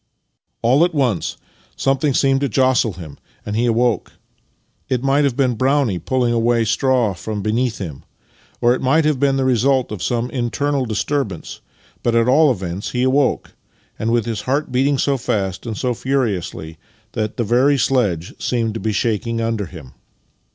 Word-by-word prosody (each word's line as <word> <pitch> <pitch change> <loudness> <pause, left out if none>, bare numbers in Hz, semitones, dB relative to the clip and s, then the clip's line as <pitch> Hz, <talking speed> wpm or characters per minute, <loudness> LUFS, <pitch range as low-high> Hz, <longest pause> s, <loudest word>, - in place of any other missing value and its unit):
All 130 +7 +4
at 175 -1 0
once 125 - 0 0.4
something 135 0 +1
seemed 135 -1 +2
to 140 - 0
jostle 130 -2 +2
him, 80 -5 -10 0.3
and 105 - -3
he 120 +2 +1
awoke. 120 0 +1 0.8
It 125 -1 0
might 140 +2 +3
have 135 -4 -1
been 130 -3 +2
Brownie 130 -5 +1
pulling 125 +1 0
away 115 0 +2
straw 120 -1 +1
from 105 +3 -5
beneath 115 +2 0
him. 80 -9 -7 0.6
or 120 +1 +4
it - - -3
might 150 +5 +3
have 150 -4 +1
been 135 -1 +2
the 135 - 0
result 130 0 +2
of 105 -4 -5
some 120 +3 -1
internal 135 +2 -1
disturbance, 110 - -3 0.4
but 120 -1 0
at 115 0 +3
all 150 +4 +5
events 95 -3 -4
he 125 0 0
awoke 130 +1 +1 0.2
— - - -38
and 110 - -1
with 120 -2 +1
his 115 -3 -3
heart 140 +1 0
beating 135 +3 +2
so 140 +1 +1
fast 100 -3 -2
and 110 -2 -4
so 125 -1 0
furiously 100 - -2 0.3
that 110 -1 -3
the 120 - +1
ver)^ 130 +5 +3
sledge 105 -10 0
seemed 115 -3 -1
to 115 - -4
be 110 - -1
shaking 115 +2 -1
under 115 -4 -1
him. 80 -9 -12
120 Hz, 175 wpm, -19 LUFS, 110-135 Hz, 0.8 s, all